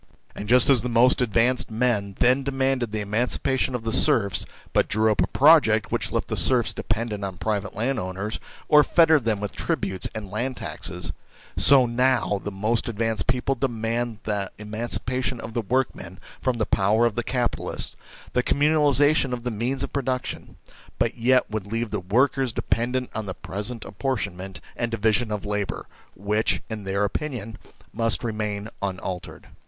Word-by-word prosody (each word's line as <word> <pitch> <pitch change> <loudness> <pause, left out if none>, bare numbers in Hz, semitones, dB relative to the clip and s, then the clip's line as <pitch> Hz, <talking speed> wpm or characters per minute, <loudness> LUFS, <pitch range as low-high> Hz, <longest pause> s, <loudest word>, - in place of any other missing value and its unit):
And 105 - -7
just 125 0 +6
as 135 -4 +5
the 125 - -3
most 120 +3 +4
advanced 120 +2 +2
men 110 -4 0
then 130 +2 +4
demanded 135 -3 0
the 110 0 -2
emancipation 125 +5 0
of 120 - -4
the 115 - -2
serfs, 100 -6 +2 0.3
but - - +3
drew 110 +1 +2
up 105 - +1
a - - +2
Project 140 -8 +5
which - - -1
left - - -1
the - - -2
serfs 125 -3 +2
dependent 110 -2 -2
on 95 -2 -4
private 105 -1 -2
landowners, 105 -3 -2 0.3
or 150 -1 +7
fettered 160 -6 +4
them 110 -3 +1
with 105 -1 -3
tributes 95 -1 -2
and 105 -3 -6
land 125 +5 -2
taxes 90 0 -5 0.4
so 130 +9 +6
now 120 -4 +1
the - - -3
most 105 +4 -1
advanced 115 0 -1
people 125 +2 +1
demand 120 -2 -2
the 100 -3 -2
emancipation 120 +4 -2
of 115 0 -7
the 120 - 0
workmen 105 -6 -2 0.2
from 130 -2 0
the 110 - 0
power 105 +4 +2
of 120 - +1
the 120 - -1
capitalists, 125 0 -2 0.4
the 125 - +3
communalisation 145 0 +3
of 120 -1 -4
the 125 - -2
means 120 +5 -2
of - - -5
production, 130 -2 -3 0.4
but 115 - 0
yet 130 +2 +3
would 105 -1 -4
leave 115 0 -2
the 105 - -1
workers 125 +7 +1
dependent 120 +4 -1
on 110 -2 -4
the 95 - -4
present 105 +4 -5
apportion 125 -9 -2
ment 95 +1 -8
and 120 - -2
division 110 +1 +1
of 105 -1 -3
labour, 105 -1 -2 0.3
which, 105 +3 0
in 105 -2 -5
their 100 +1 0
opinion, 115 0 -3 0.4
must 115 +2 0
remain 105 -2 -3
unaltered. 95 -2 -5
115 Hz, 170 wpm, -24 LUFS, 105-125 Hz, 0.4 s, or